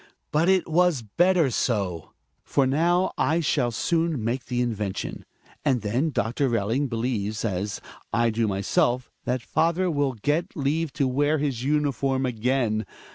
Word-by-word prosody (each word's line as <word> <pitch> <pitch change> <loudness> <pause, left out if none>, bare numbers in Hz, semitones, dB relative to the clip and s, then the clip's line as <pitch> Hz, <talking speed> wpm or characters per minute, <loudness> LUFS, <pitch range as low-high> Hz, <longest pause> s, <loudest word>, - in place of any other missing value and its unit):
But 160 +4 +2
it 190 -2 +3
was 170 -5 +2
better 170 - +2
so; 100 -10 -1 0.3
for 140 - +1
now 170 +7 +2
I 160 +2 +2
shall 130 -6 +1
soon 160 +2 0
make 120 +3 -2
the 125 0 -2
invention; 105 -5 -3 0.4
and 130 -5 +2
then 120 +10 0
Doctor 130 +1 0
Belling 115 +5 0
believes, 115 -3 -2
as 100 0 -2 0.3
I 115 +1 +2
do, 110 0 0
myself, 115 +5 0
that 125 0 -1
father 170 +2 +1
will 145 -3 0
get 145 +9 -1
leave 150 +2 0
to 140 -2 +1
wear 145 +4 +2
his 140 -5 -2
uniform 140 -2 +1
again. 115 -3 0
130 Hz, 145 wpm, -25 LUFS, 115-150 Hz, 0.4 s, it